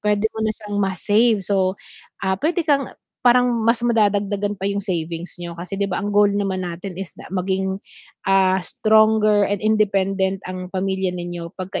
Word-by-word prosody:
puwede 210 0 +1
mo 220 - -6
na 220 - +1
siyang 205 -1 -6
ma-save. 205 +4 +2
So, 190 -1 +1 0.5
ah, 190 0 +2
puwede 345 +3 +1
kang 280 -3 +2 0.4
parang 250 0 +5 0.2
mas 230 +1 +3
madadagdagan 205 -3 +1
pa 195 - -2
yung 200 0 -2
savings 170 -1 -4
niyo 170 -1 -6
kasi 180 +3 -6
'di 200 - +1
ba 180 - -2
ang 205 +1 -3
goal 205 0 +5
naman 195 -2 -1
natin 180 +2 -6
is 195 - -5
na - - -10
maging, 190 0 -1 0.5
ah, 190 -1 +4
stronger 215 -1 +4
and 205 -1 -1
independent 195 -3 +1
ang 185 0 -6
pamilya 190 0 -1
ninyo 175 -1 -5
'pag 185 0 -6
ka - - 0
195 Hz, 180 wpm, -21 LUFS, 185-210 Hz, 0.5 s, parang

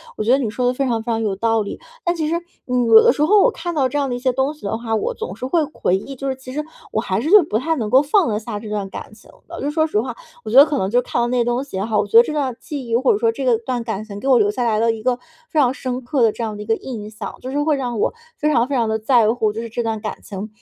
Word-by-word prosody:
我 - - -3
觉 225 - +2
得 265 - +6
你 255 -6 -1
说 245 +3 -1
得 250 - +2
非 275 +2 -1
常 235 -3 0
非 235 - -2
常 225 0 0
有 210 -3 -1
道 225 +2 +1
理。 200 - -6 0.3
但 345 0 +1
其 310 -2 -1
实， 335 - 0 0.3
嗯， 250 -1 +1
有 225 -1 +8
的 - - +6
时 275 - -3
候 415 +5 +5
我 - - +4
看 345 -4 -5
到 270 -4 +2
这 290 - -2
样 280 -1 +1
的 245 - -2
一 - - -5
些 255 +1 +1
东 265 +3 0
西 305 - -21
的 210 +2 -1
话， 225 -1 -2
我 215 - -1
总 185 - -6
是 240 - -6
会 320 +6 +2
回 185 - +1
忆， 275 +8 -8
就 275 +1 -4
是 265 - -2
其 255 -1 -10
实 300 +2 -2 0.3
我 220 - 0
还 190 -4 -1
是 350 - +6
不 210 - +1
太 320 +7 0
能 225 -7 -3
够 260 +4 +6
放 315 - +2
得 210 -1 -1
下 215 -1 -6
这 215 0 -9
段 205 -2 -3
感 - - -8
情 - - -18 0.2
的。 - - -8
就 290 - -1
说 315 +1 +1
实 210 - 0
话， 245 0 -5 0.3
我 215 - -6
觉 245 - +3
得 280 - +10
可 295 -2 -2
能 190 - 0
就 245 +4 +3
看 240 - -2
到 235 - +1
那 250 +1 0
些 240 - +3
东 240 +2 0
西 275 -9 -7
也 190 - -1
好， 220 -2 0
我 - - +1
觉 215 - +4
得 235 - +10
这 305 - -4
段 275 -5 -1
记 280 -5 -6
忆， 230 - 0
或 255 +3 +3
者 - - 0
说 225 +1 +2
这 245 -1 +1
段 240 0 -3
感 220 -3 -4
情 205 -2 -8
给 265 - -5
我 260 -2 +6
留 205 -1 +3
下 245 +4 -2
来 220 -2 +1
了 230 +1 +3
一 225 -1 -6
个 245 +2 +1 0.3
非 310 - 0
常 255 -3 +3
深 255 -1 -4
刻 255 +2 -1
的 225 -2 +5
这 230 - -5
样 215 -2 -3
的 210 - -6
一 - - -12
个 225 - +1
印 225 -4 -7
象， 215 0 -7
就 255 - -6
是 285 +2 -1
会 305 0 +2
让 245 -4 -3
我 - - +1 0.2
非 300 0 +1
常 240 -4 +2
非 280 - -2
常 230 -3 +1
地 220 0 0
在 225 -1 +3
乎 220 -3 0
就 225 - -4
是 230 - -6
这 235 +2 -3
段 225 -1 -2
感 215 - -5
情。 200 +2 -7
240 Hz, 375 characters per minute, -20 LUFS, 220-270 Hz, 0.3 s, 得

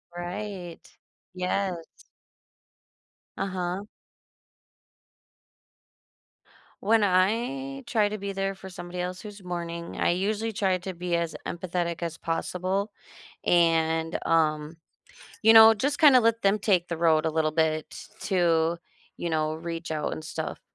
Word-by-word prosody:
Right. 175 0 -6 0.5
Yes. 185 +1 -1 1.6
Uh-huh. 185 +1 -3 3.0
When 220 +1 +3
I 240 +9 0
try 215 -3 +2
to 215 +1 -5
be 200 0 -4
there 195 0 -1
for 190 0 -11
somebody 180 0 -8
else 180 +1 -4
who's 205 -2 -10
mourning, 170 -1 -5
I - - +2
usually 210 +5 -1
try 190 -2 +1
to 185 +1 -6
be 175 0 -2
as 170 -1 -2
empathetic 175 -1 -3
as 165 -1 -4
possible, 185 +4 -2 0.5
and, 165 -1 +2
um, 155 -1 +1 0.7
you 225 +1 +7
know, 225 0 +10
just 275 +7 -1
kinda 280 -5 +7
let 230 0 +2
them 200 +2 +3
take 190 -4 +1
the 170 -2 -3
road 160 -2 +3
a 160 - +1
little 155 -1 0
bit 155 -1 -1
to, 170 -3 +2 0.4
you 170 - -3
know, 155 -1 0
reach 165 0 -6
out 155 -1 -2
and - - -5
stuff. - - -5
180 Hz, 125 wpm, -27 LUFS, 165-200 Hz, 3.0 s, know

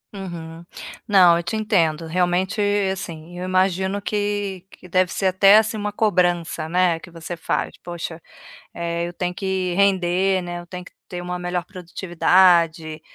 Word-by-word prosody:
Uhum. 170 -4 -8 0.4
Não, 180 -4 +6
eu - - -1
te 175 +5 -3
entendo. 170 -7 +1
Realmente, 180 +4 0 0.3
assim, 175 -2 -7
eu 180 - -4
imagino 190 +1 +1
que 205 -2 -2
que 180 - -15
deve 185 0 +1
ser 195 - 0
até, 195 +2 +6
assim, 220 +1 +2
uma 210 0 -3
cobrança, 175 -6 0
né, 175 -1 +2
que 175 - -13
você 165 +1 -7
faz: 165 - -2
"Poxa, 170 -1 -6 0.5
eh, 170 0 -3
eu 175 - -8
tenho 180 0 -3
que 190 -1 -2
render, 190 -1 +2
né, 175 0 -5
eu 175 - -11
tenho 180 0 -7
que - - -15 0.2
ter 175 -1 -6
uma 180 0 -4
melhor 180 0 -2
produtividade", 175 -3 +2
180 Hz, 160 wpm, -22 LUFS, 170-190 Hz, 0.5 s, Não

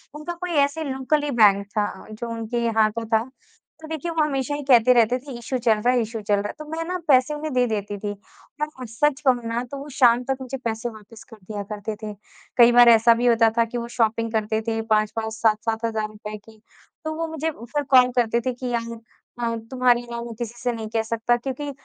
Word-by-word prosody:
उनका 305 +4 -5
कोई 350 +1 -5
ऐसे 315 +3 -5
लोकल 275 +1 0
ही 290 - -2
बैंक 200 -1 +6
था 205 - +1 0.2
जो 225 +2 -6
उनके 230 +1 -3
यहाँ 220 -2 +3
पे 225 - -6
था। 225 +2 0 0.5
तो 315 - -9
देखिए 320 +2 -4
वो 320 -2 +2
हमेशा 285 -1 -1
ही 290 - -5
कहते 250 -2 +6
रहते 240 +1 +3
थे 275 +2 -11
इशू 245 +2 -3
चल 235 -2 +3
रहा 245 +4 +2
है 245 - +2
इशू 225 0 -4
चल 205 - +2
रहा 200 +1 -2
है। - - -6
तो 305 - -7
मैं 325 +1 -2
ना 365 - -2
पैसे 260 0 +4
उन्हें 300 -1 -4
दे 250 -1 +3
देती 205 -2 -3
थी, 205 0 -3 0.5
और 300 -4 -4
सच 270 +5 +1
कहूँ 250 -2 +3
ना 235 +2 -2
तो 280 - -5
वो 280 +2 -8
शाम 245 -2 +4
तक 265 +1 -2
मुझे 260 +1 -5
पैसे 225 +1 -2
वापस 215 0 -13
कर 225 - -12
दिया 205 +1 -6
करते 210 +1 -4
थे। 210 -1 -4 0.4
कई 240 -1 +8
बार 240 0 +8
ऐसा 230 0 +7
भी 240 +1 -1
होता 230 -1 +5
था 230 - +4
कि 235 +2 -5
वो 235 0 -4
शॉपिंग 225 -1 +1
करते 220 0 0
थे 225 0 0
5-5 220 +1 0
7-7 225 0 0
हज़ार 220 -1 -1
रुपये 215 0 -8
की, 215 +1 -19 0.4
तो 315 - -2
वो 330 +1 -2
मुझे 320 0 -2
फिर 285 +2 -4
कॉल 255 -2 +6
करते 235 -1 +2
थे 255 +1 -2
कि 250 +1 -6
यार 230 0 -2 0.5
अ, 230 -1 0 0.2
तुम्हारे 250 -2 +3
अलावा 235 -1 -6
मैं 235 - -7
किसी 235 -1 -4
से 245 - +1
नहीं 220 -1 -5
कह 225 - +2
सकता 230 +1 0
क्योंकि 275 +3 -5
235 Hz, 235 wpm, -23 LUFS, 220-265 Hz, 0.5 s, कई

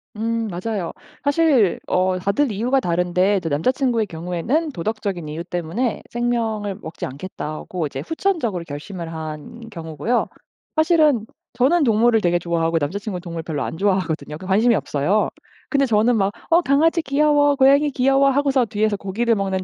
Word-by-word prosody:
음 230 +1 -1
맞아요. 190 -1 -3 0.3
사실 285 - +3
어 185 0 +1
다들 205 +8 +1
이유가 245 +7 +1
다른데 180 +2 +1
이제 165 -3 -3
남자 150 - +2
친구의 245 -4 0
경우에는 180 - -2
도덕적인 195 - -3
이유 155 +3 -5
때문에 175 +8 -2
'생명을 225 -4 -1
먹지 160 - -5
않겠다.'고 155 +2 -5
이제 135 0 -6
후천적으로 320 - -1
결심을 165 +3 -7
한 160 +9 -7
경우고요. 165 - -2 0.5
사실은 310 -7 +3 0.3
저는 270 +8 +3
동물을 225 -1 +3
되게 175 -1 +2
좋아하고 165 -1 0
남자 165 +8 -2
친구는 195 -4 -5
동물을 170 -2 -6
별로 155 -3 -3
안 - - -5
좋아하거든요. 180 -6 -1
그 185 - -10
관심이 220 +5 +3
없어요. 180 +6 0 0.4
근데 275 -1 +2
저는 225 +2 +3
막 195 0 +1 0.2
"어 340 +2 +6
강아지 325 +4 +3
귀여워. 290 0 +3
고양이 280 +2 +5
귀여워." 270 +1 +3
하고서 275 -2 +2
뒤에서 215 -2 0
고기를 220 +5 0
먹는 190 -2 -1
210 Hz, 385 characters per minute, -21 LUFS, 175-255 Hz, 0.5 s, 어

